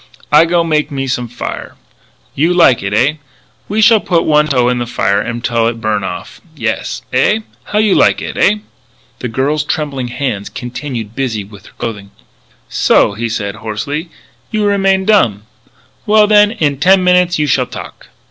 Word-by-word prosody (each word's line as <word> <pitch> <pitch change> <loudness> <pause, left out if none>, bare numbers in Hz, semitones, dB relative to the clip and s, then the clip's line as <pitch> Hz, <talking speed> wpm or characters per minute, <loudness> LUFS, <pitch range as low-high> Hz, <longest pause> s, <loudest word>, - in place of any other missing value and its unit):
"I 150 +2 +6
go 170 0 +2
make 155 -2 0
me 135 -2 -3
some 125 -2 -2
fire. 120 - -7 0.6
You 165 +5 +1
like 165 -9 +5
it, 100 +1 -3
eh? 130 +9 +2 0.5
We 215 +2 +1
shall 225 0 +6
put 170 -4 +1
one 150 0 +3
toe 125 -4 +2
in 125 0 0
the 120 - -3
fire 100 -4 0
until 115 0 -1
it 115 0 -3
burn 110 -2 -1
off. 90 -2 -7
Yes? - - -3
Eh? 220 +1 +2 0.2
How 210 - -3
you 210 -2 +3
like - - +3
it? - - -6
Eh?" 210 +2 +2 0.6
The 125 - -3
girl's 140 +6 -1
trembling 145 -4 -3
hands 120 -5 -3
continued 120 -3 -6
busy 120 -6 -2
with 100 0 -15
her - - -18
clothing. 105 -4 -5 0.6
"So!" - - +2
he 115 +3 -3
said, 105 -2 -3
hoarsely, 140 - -4 0.4
"you 215 -1 -1
remain 195 -1 +2
dumb! 120 - +2 0.6
Well, 210 0 +5
then, 210 0 +5
in 150 - -1
ten 185 +3 +4
minutes 180 -1 +3
you 150 - +1
shall 145 - +1
talk!" - - -10
140 Hz, 175 wpm, -14 LUFS, 115-180 Hz, 0.6 s, I